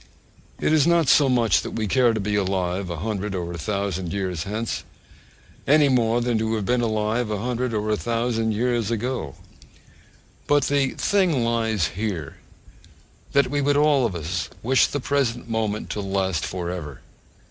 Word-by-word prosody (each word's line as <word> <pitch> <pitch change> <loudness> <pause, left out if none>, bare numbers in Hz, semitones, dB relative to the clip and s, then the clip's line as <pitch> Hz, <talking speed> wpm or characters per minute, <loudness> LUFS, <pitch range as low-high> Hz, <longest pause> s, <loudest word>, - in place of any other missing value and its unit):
It - - +1
is 155 0 +4
not 170 -3 +3
so 140 -1 +5
much 120 -4 +3
that - - -6
we 110 - -1
care 120 +3 +3
to 110 - -2
be 105 +1 -2
alive 95 -2 -1
a 85 - -3
hundred 105 -2 -2
or 85 -1 -4
a - - -5
thousand 95 -1 -2
years 95 -5 -3
hence, 110 +3 -3 0.8
any 145 0 +5
more 120 -2 +2
than 120 -2 0
to 110 0 0
have 105 -3 -2
been 125 +2 +1
alive 110 +1 0
a 105 - -1
hundred 125 +3 -2
or 110 -1 -1
a - - +3
thousand 115 -1 -1
years 120 -1 0
ago: 115 - -3 1.1
but 145 -1 +3
the 140 -1 +1
thing 180 -11 +2
lies 110 -6 0
here, 95 -8 -4 1.0
that 140 -2 +3
we 145 0 0
would 145 +1 +2
all 145 -2 +4
of 95 - -6
us 85 +1 -3
wish 130 +3 +4
the 145 - -3
present 125 -4 -1
moment 110 -2 -2
to 105 - -3
last 95 -4 -1
for 90 -2 -4
ever. 75 -7 -7
110 Hz, 175 wpm, -23 LUFS, 100-125 Hz, 1.1 s, so